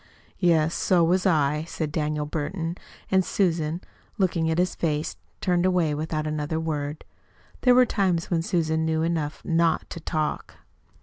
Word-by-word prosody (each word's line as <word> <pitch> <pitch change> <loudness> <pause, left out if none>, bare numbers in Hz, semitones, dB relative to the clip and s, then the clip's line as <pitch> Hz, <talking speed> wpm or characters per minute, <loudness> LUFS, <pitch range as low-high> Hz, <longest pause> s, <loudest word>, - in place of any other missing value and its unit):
"Yes, 165 -3 +3
so 180 -2 +3
was 180 +3 +2
I," 150 -3 +2
said 155 -2 -3
Daniel 150 -1 -1
Burton. 165 +3 -3 0.4
And 190 0 +4
Susan, 170 -3 0 0.4
looking 170 -4 +1
at 160 - 0
his 180 +1 +1
face, 155 -2 -1 0.3
turned 175 -2 +2
away 180 -4 +2
without 155 +1 -2
another 155 +1 -2
word. 150 -2 -3 0.6
There 250 -1 +5
were 250 0 +7
times 185 -7 0
when 165 -2 +2
Susan 160 -2 0
knew 160 0 +1
enough 160 -3 -2
not 165 -1 +2
to - - -5
talk. 155 -1 -3
160 Hz, 150 wpm, -25 LUFS, 155-175 Hz, 0.6 s, were